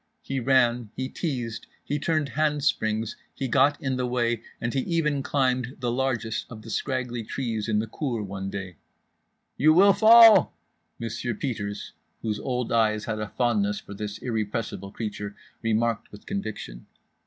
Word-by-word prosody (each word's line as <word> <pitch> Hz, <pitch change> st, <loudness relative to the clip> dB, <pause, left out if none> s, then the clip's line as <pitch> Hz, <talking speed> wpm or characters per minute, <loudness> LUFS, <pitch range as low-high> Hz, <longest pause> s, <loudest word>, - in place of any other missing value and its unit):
He 135 Hz, -1 st, -2 dB
ran, 120 Hz, -3 st, +3 dB
he 130 Hz, -, -2 dB
teased, 125 Hz, -10 st, -4 dB, 0.2 s
he 145 Hz, -, -2 dB
turned 155 Hz, -1 st, 0 dB
handsprings, 130 Hz, -6 st, 0 dB, 0.2 s
he 135 Hz, -, -2 dB
got 145 Hz, +4 st, +3 dB
in 130 Hz, -1 st, -1 dB
the 125 Hz, -1 st, 0 dB
way, 120 Hz, -2 st, 0 dB, 0.2 s
and 120 Hz, 0 st, -2 dB
he 135 Hz, -, +1 dB
even 150 Hz, -1 st, 0 dB
climbed 130 Hz, -2 st, 0 dB
the 120 Hz, -2 st, -1 dB
largest 120 Hz, -3 st, -1 dB
of 110 Hz, -3 st, -10 dB
the 115 Hz, -, -8 dB
scraggly 125 Hz, -3 st, -2 dB
trees 110 Hz, -2 st, -3 dB
in 105 Hz, -, +2 dB
the 110 Hz, -, +1 dB
cour 115 Hz, -1 st, -3 dB
one 95 Hz, 0 st, -5 dB
day. 95 Hz, -4 st, -6 dB, 0.8 s
"You 155 Hz, +2 st, +5 dB
will 200 Hz, +3 st, +7 dB
fall," 225 Hz, +2 st, +8 dB, 0.4 s
Monsieur 115 Hz, 0 st, -3 dB
Peters 105 Hz, -5 st, -4 dB, 0.3 s
(whose 105 Hz, -2 st, -1 dB
old 125 Hz, -2 st, -2 dB
eyes 110 Hz, -2 st, +2 dB
had 110 Hz, -1 st, -3 dB
a 105 Hz, -, -3 dB
fondness 105 Hz, -3 st, 0 dB
for -, -, -10 dB
this 105 Hz, 0 st, -5 dB
irrepressible 105 Hz, -4 st, -3 dB
creature) 105 Hz, -2 st, -5 dB, 0.3 s
remarked 115 Hz, 0 st, 0 dB
with 105 Hz, -, -13 dB
conviction. 110 Hz, -, -5 dB
120 Hz, 155 wpm, -26 LUFS, 110-135 Hz, 0.8 s, fall